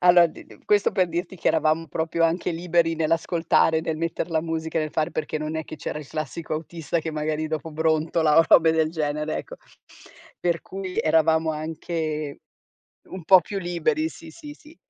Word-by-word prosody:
allora 175 -1 +7
d 155 - -12
d - - -18
questo 205 -1 +3
per 185 -3 +2
dirti 175 +3 -4
che - - 0
eravamo 160 +1 +1
proprio 165 +3 0
anche 170 +2 0
liberi 170 -1 +1
nell'ascoltare, 165 0 +2
nel 160 -1 -3
metter 165 +2 -2
la 160 -1 +1
musica, 160 0 -2
nel 155 -1 -1
fare, 155 +2 -1
perché 155 0 -3
non 155 +1 -4
è 160 - -3
che 155 - -9
c'era 150 - -5
il 150 - -9
classico 155 +1 -5
autista 165 +1 -3
che 160 0 -3
magari 155 0 -2
dopo 155 0 -4
brontola 160 0 +1
o 165 - +7
robe 160 -1 +6
del 160 -1 +1
genere, 150 -1 -2
ecco. - - -8 0.8
Per 170 -1 0
cui 190 -1 -6
eravamo 160 0 +3
anche 155 -1 -4 0.7
un 185 -3 -8
po' 185 +1 +8
più 200 +4 -5
liberi, 175 - 0
sì, 325 -1 -12
sì, 300 -3 -10
sì. 310 +2 -18
160 Hz, 185 wpm, -24 LUFS, 155-170 Hz, 0.8 s, po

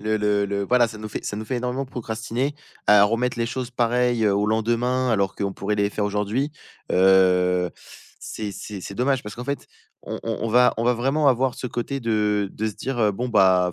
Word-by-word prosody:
le 110 +1 0
le 105 -1 +1
le 100 0 -2
voilà, 125 +2 +4
ça 110 -1 -9
nous 110 0 -6
fait 105 - -6
ça 105 - -3
nous 110 - -5
fait 125 - -2
énormément 125 +2 -2
procrastiner, 120 +3 -3 0.3
à 105 -1 +7
remettre 115 +3 0
les 115 - 0
choses, 125 +1 -4
pareil, 120 -1 +1
heu, 100 -2 +3
au 100 +1 +1
lendemain 120 +4 +1
alors 100 -4 +1
qu'on 100 -1 -2
pourrait 100 +2 -2
les 100 0 +2
faire 105 - -2
aujourd'hui. 105 +7 -1 0.4
Heu, 90 -1 +4 0.5
c'est 105 -2 -5
c'est 100 0 -7
c'est 100 - -7
dommage 130 +3 +1
parce 105 - -8
qu'en 120 - -6
fait, 140 +2 -4 0.4
on - - -5
on 115 -1 -2
on 115 - -1
va 125 +2 +4
on 115 - -1
va 125 - +4
vraiment 135 +5 +2
avoir 130 0 +2
ce - - -5
côté 125 +3 -3
de 105 -3 +1
de 110 - -3
se 105 - -7
dire: 130 +3 -4
«Heu, 105 -1 +3
bon, 125 +6 -3
bah, 95 -5 +4
110 Hz, 225 wpm, -23 LUFS, 105-125 Hz, 0.5 s, à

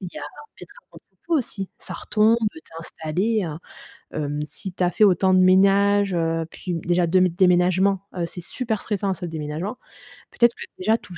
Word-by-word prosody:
Il 185 - -6
y - - -14
a - - -8 0.3
peut - - -16
être - - -11
un - - -54
contre - - -16 0.2
coup 340 - +1
aussi, 205 -8 -4
ça - - -9
retombe 215 +2 +2
heu, 220 - +1 0.2
tu - - -25
es 160 - -13
installée 180 +7 -2
à 160 -4 -5 0.6
hem. 145 0 -2
Si 175 +5 -7
tu 185 - -3
as 175 - +2
fait 215 - +3
autant 190 -1 +4
de 185 - +5
ménage, 195 +2 +4
heu, 165 -1 0
puis 180 - -5
b 165 - -5
déjà 175 0 +2
2 180 +3 +3
m 185 - +4
déménagements, 185 +2 +3
heu, 175 -2 -2
c'est 175 +1 -7
super 220 +3 -3
stressant 200 -2 -2
à - - 0
ce 185 - -8
déménagement. 160 +6 -5 0.5
Peut-être 235 -1 +3
que - - -8
déjà 220 +4 +2
tout 180 -6 -13
185 Hz, 225 wpm, -23 LUFS, 170-200 Hz, 0.6 s, de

